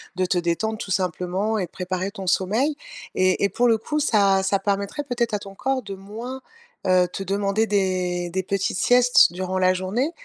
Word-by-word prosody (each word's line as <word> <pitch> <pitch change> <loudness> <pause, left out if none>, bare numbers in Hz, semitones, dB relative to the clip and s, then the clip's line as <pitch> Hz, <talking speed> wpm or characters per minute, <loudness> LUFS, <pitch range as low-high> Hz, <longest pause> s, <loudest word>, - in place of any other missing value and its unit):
de 185 +1 +1
te 180 0 0
détendre 175 +6 -1
tout 195 - -6
simplement 185 +3 -1
et 190 - -1
de - - -41
préparer 185 +1 -3
ton 195 -2 -8
sommeil. 220 +12 +1 0.4
Et 185 +1 +2
et 200 - +3
pour 245 +4 +1
le 225 -1 +4
coup, 300 +7 -2
ça 200 -8 +3
ça 195 +1 +1
permettrait 200 +8 -2
peut-être 240 -4 -2
à 210 - +1
ton 195 -1 -11
corps 265 +4 -1
de 200 -4 -7
moins, 225 +7 -8 0.5
heu, 185 -1 +4
te 195 - -5
demander 200 +3 0
des 185 -4 0
des 190 +2 -2
petites 195 -1 -1
siestes 245 -5 +5
durant 185 +1 -3
la 185 0 +4
journée. 195 - -1
195 Hz, 200 wpm, -23 LUFS, 185-220 Hz, 0.5 s, siestes